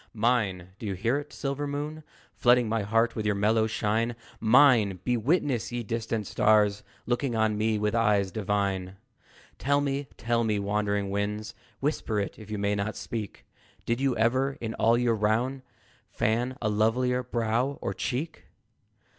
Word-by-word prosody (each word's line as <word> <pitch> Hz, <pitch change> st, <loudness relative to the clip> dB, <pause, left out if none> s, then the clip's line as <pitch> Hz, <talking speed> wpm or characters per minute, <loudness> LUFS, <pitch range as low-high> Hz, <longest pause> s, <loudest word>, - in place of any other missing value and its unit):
Mine! 105 Hz, -6 st, +1 dB
Do 110 Hz, -, -5 dB
you 100 Hz, -, -2 dB
hear 115 Hz, +9 st, 0 dB
it, 145 Hz, 0 st, -10 dB
silver 140 Hz, +1 st, -3 dB
moon, 150 Hz, +2 st, -4 dB, 0.3 s
Flooding 120 Hz, +3 st, +4 dB
my 110 Hz, 0 st, 0 dB
heart 115 Hz, +3 st, +1 dB
with 110 Hz, -, -2 dB
your 105 Hz, -1 st, +1 dB
mellow 110 Hz, +2 st, +2 dB
shine? 110 Hz, +2 st, 0 dB, 0.2 s
Mine! 110 Hz, -5 st, +5 dB
Be 125 Hz, -, +1 dB
witness, 130 Hz, -1 st, 0 dB
ye 120 Hz, 0 st, -3 dB
distant 115 Hz, 0 st, -2 dB
stars, 105 Hz, 0 st, +3 dB, 0.2 s
Looking 120 Hz, 0 st, -1 dB
on 110 Hz, -1 st, +2 dB
me 110 Hz, +1 st, +1 dB
with 105 Hz, 0 st, 0 dB
eyes 105 Hz, -4 st, +2 dB
divine! 100 Hz, -3 st, -1 dB, 0.6 s
Tell 140 Hz, +1 st, +2 dB
me, 140 Hz, 0 st, -2 dB
tell 115 Hz, +2 st, 0 dB
me, 110 Hz, -2 st, +1 dB
wandering 100 Hz, 0 st, -1 dB
winds, 105 Hz, +2 st, -2 dB, 0.3 s
Whisper 135 Hz, -7 st, -1 dB
it, 100 Hz, -, -4 dB
if 110 Hz, -1 st, -12 dB
you 105 Hz, -, -3 dB
may 100 Hz, 0 st, 0 dB
not 100 Hz, +1 st, -2 dB
speak 110 Hz, -4 st, -6 dB, 0.4 s
Did 120 Hz, +2 st, -1 dB
you 135 Hz, -3 st, +1 dB
ever, 130 Hz, +5 st, +1 dB
in 115 Hz, -1 st, -4 dB
all 115 Hz, +1 st, +3 dB
your 120 Hz, -1 st, +2 dB
round, 115 Hz, +5 st, 0 dB, 0.5 s
Fan 120 Hz, +4 st, 0 dB
a -, -, +2 dB
lovelier 120 Hz, +4 st, +1 dB
brow 120 Hz, +2 st, -1 dB
or -, -, -3 dB
cheek? 150 Hz, +6 st, -4 dB
115 Hz, 165 wpm, -27 LUFS, 105-125 Hz, 0.6 s, Mine